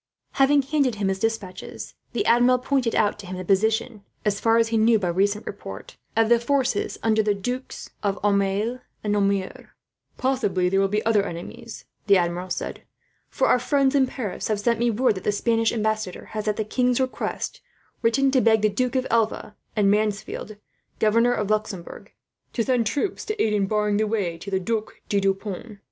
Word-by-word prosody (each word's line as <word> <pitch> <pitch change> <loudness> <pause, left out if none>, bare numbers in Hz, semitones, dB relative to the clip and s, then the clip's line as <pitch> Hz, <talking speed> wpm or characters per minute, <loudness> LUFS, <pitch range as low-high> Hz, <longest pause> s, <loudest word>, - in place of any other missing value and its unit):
Having 275 +1 +4
handed 275 -4 +1
him 200 -2 -1
his 190 0 -1
despatches, 225 -4 -4 0.2
the - - -1
Admiral 245 +2 +5
pointed 250 -2 0
out 210 -1 +2
to 200 - -9
him 185 0 -5
the 185 - -6
position, 220 +3 +1 0.2
as 210 0 +1
far 225 0 +3
as 230 -1 +3
he 230 - -1
knew 225 +1 +5
by 185 -4 -1
recent 200 +4 0
report, 95 - -8 0.2
of 225 0 +4
the 235 +1 +5
forces 260 -3 0
under 220 -1 +3
the 210 -1 +1
Dukes 250 +6 -5
of 200 -1 0
Aumale 205 +4 +1 0.2
and 210 -1 0
Nemours. 200 -2 -1 0.5
"Possibly 205 -9 +1
there 195 +1 +2
will 195 - +3
be 210 +2 -1
other 220 -2 +4
enemies," 205 +6 -8 0.2
the 200 -1 +6
Admiral 175 +1 -1
said; - - -4 0.5
"for - - 0
our 250 - +4
friends 275 +1 +2
in 270 -2 +4
Paris 230 -7 -4
have 215 -2 0
sent 235 +2 +1
me 240 0 +2
word 235 +2 +2
that 185 -2 -7
the - - +1
Spanish 225 +2 +1
ambassador 215 -4 -2
has, 215 0 -3
at 210 - +1
the 220 - -1
king's 250 +3 +1
request, 260 -1 -3 0.4
written 265 +4 +3
to 260 -2 +3
beg 220 -2 +4
the 215 - +5
Duke 250 +5 -1
of 260 0 +1
Alva, 220 -2 0 0.2
and 200 -2 +3
Mansfeld, 210 0 -2 0.4
governor 230 +3 +3
of 210 -2 -1
Luxembourg, 210 -5 -3 0.4
to 230 - 0
send 245 -2 +1
troops 290 - -2
to 430 0 -4
aid 215 - +2
in 200 -2 +1
barring 210 0 +1
the 215 0 +1
way 190 -6 -2
to 195 - -7
the 190 -1 0
Duc 220 +3 -3
de 200 - +2
Deux 195 0 +2
Ponts. 205 +2 -7
215 Hz, 195 wpm, -24 LUFS, 200-240 Hz, 0.5 s, the